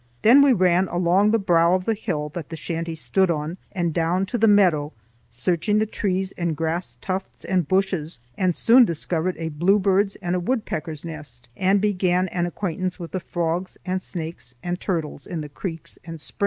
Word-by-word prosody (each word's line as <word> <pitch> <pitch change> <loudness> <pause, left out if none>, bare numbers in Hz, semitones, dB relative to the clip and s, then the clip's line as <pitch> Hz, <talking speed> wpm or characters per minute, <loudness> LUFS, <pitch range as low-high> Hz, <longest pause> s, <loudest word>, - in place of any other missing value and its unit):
Then 245 +6 +8
we 280 -1 +6
ran 185 -3 +3
along 175 +4 +3
the 225 - +4
brow 175 -3 +3
of 185 -1 -2
the 225 - +2
hill 175 -9 -3
that 165 -1 -7
the 165 - -5
shanty 165 +1 -4
stood 190 +4 +1
on, 160 +2 -2
and 175 -4 -1
down 175 +3 +1
to 225 +5 -3
the 225 - +5
meadow, 175 -8 +4 0.4
searching 170 - 0
the 215 - +3
trees 190 -3 -2
and 170 -3 -1
grass 165 +3 -2
tufts 190 0 -5
and 180 -5 +1
bushes, 185 -4 0 0.2
and 185 -3 +1
soon 245 +2 +6
discovered 170 -1 -1
a 165 -1 -3
bluebird's 195 +5 +2
and 175 -1 -2
a - - +1
woodpecker's 170 - -3
nest, 150 -7 -7
and 190 +4 +2
began 185 -3 +1
an 175 -1 -1
acquaintance 185 0 -3
with 170 -3 -8
the 185 - -2
frogs 175 +1 -3
and 185 0 -1
snakes 160 -9 -6
and 175 0 -2
turtles 160 -6 -3
in 170 -3 -4
the 150 - -7
creeks 165 +2 -7
and 165 -1 -8
springs. - - -5
175 Hz, 190 wpm, -23 LUFS, 165-190 Hz, 0.4 s, Then